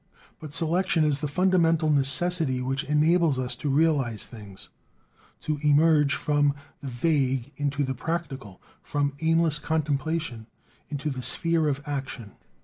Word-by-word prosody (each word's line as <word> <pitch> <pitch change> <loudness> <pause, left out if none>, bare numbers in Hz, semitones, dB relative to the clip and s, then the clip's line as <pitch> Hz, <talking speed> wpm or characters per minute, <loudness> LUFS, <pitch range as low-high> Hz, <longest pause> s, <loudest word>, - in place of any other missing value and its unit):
But 155 -2 -9
selection 165 +1 +1
is 150 -2 +1
the 150 - -1
fundamental 165 -1 +2
necessity 140 0 +2
which 135 +2 -2
enables 155 0 +2
us 125 -1 -3
to 145 - -3
realize 140 -7 +1
things; 105 -5 -12 0.7
to 150 -1 -2
emerge 150 -1 +4
from 145 -1 +1 0.3
the 140 - -7
vague 135 -1 0
into 145 0 -1
the 130 -1 -2
practical, 135 - -5 0.2
from 145 -1 -2
aimless 165 -1 +2
contemplation 155 -5 -2 0.4
into 145 0 -3
the 130 -2 -5
sphere 165 +3 +1
of 145 0 -2
action. 135 -7 -5
145 Hz, 135 wpm, -26 LUFS, 135-160 Hz, 0.7 s, emerge